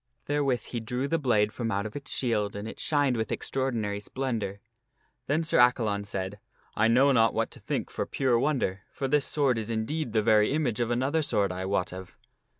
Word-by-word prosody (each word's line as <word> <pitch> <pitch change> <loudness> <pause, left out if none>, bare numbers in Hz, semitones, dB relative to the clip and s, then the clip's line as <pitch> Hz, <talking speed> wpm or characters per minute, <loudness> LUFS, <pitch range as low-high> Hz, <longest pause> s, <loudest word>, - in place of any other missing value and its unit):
Therewith 140 -4 +1
he 120 - -5
drew 125 +4 -2
the 165 +3 0
blade 110 -7 +2
from 115 -2 -3
out 100 -1 -1
of 110 - -6
its 140 -1 -7
shield 105 -5 0
and 100 +1 -5
it - - -8
shined 145 -4 +2
with 110 -1 -2
extraordinary 115 -6 -1
splendor. 105 -3 -3 0.7
Then 155 +4 +1
Sir 160 - +2
Acca 125 0 +7
Qomyne - - 0
shmaetk - - +1
Ion 100 0 -2
said, 100 -1 -4 0.2
" - - -35
1 110 +2 +3
know 135 +4 +5
not 115 -4 +4
what - - 0
to - - -10
think - - -3
for - - -3
pure 130 -4 +1
wonder, 125 -9 0
for 135 - -3
this 145 +1 +2
J^jgjj^ - - -5
sword 140 -5 +2
is 110 0 -5
indeed 115 +4 -2
the 110 -2 +2
very 110 +2 +4
image 135 -8 0
of 120 -1 0
another 130 +6 +1
sword 100 -9 +1
I 90 +1 -4
wot 90 -2 -1
of." 95 -1 -9
115 Hz, 230 wpm, -28 LUFS, 105-135 Hz, 0.7 s, Acca